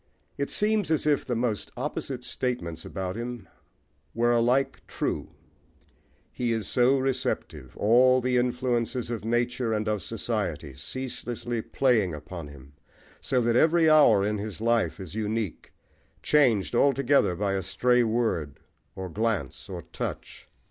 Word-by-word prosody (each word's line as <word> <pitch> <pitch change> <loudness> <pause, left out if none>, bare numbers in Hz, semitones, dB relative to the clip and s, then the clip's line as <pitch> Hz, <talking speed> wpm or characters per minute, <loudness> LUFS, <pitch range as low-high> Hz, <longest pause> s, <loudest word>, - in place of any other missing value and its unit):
It 140 - -2
seems 210 -3 +1
as 160 -2 +1
if 150 -2 +2
the 125 - -1
most 115 -3 -1
opposite - - -4
statements 85 -11 -3
about 95 -1 -4
him 120 -3 -6 0.7
were 120 +1 +3
alike 120 +3 +2
true: - - -3 1.0
he 120 -2 -1
is 110 -4 -1
so 125 +2 +3
receptive, 135 -1 -3
all 125 +4 +5
the 125 0 0
influences 125 -1 0
of 115 -3 -4
nature 120 +1 0
and 105 0 -1
of 105 -2 0
society 100 - -3
ceaselessly 120 - -4
playing 110 - +1
upon 75 +2 -8
him, 70 -1 -14 0.5
so 130 -2 +1
that 115 0 +1
every 160 +3 +5
hour 115 -10 +6
in 105 0 -1
his 105 0 -5
life 115 -8 +1
is 95 -3 -8
unique, 110 -3 -3 0.5
changed 125 -10 +3
altogether 140 -5 +3
by 100 +1 -1
a 95 - 0
stray 125 +6 +2
word, 110 -11 -1 0.4
or 95 -1 -5
glance, 110 +2 -2
or - - -6
touch. - - -6
115 Hz, 140 wpm, -27 LUFS, 100-125 Hz, 1.0 s, hour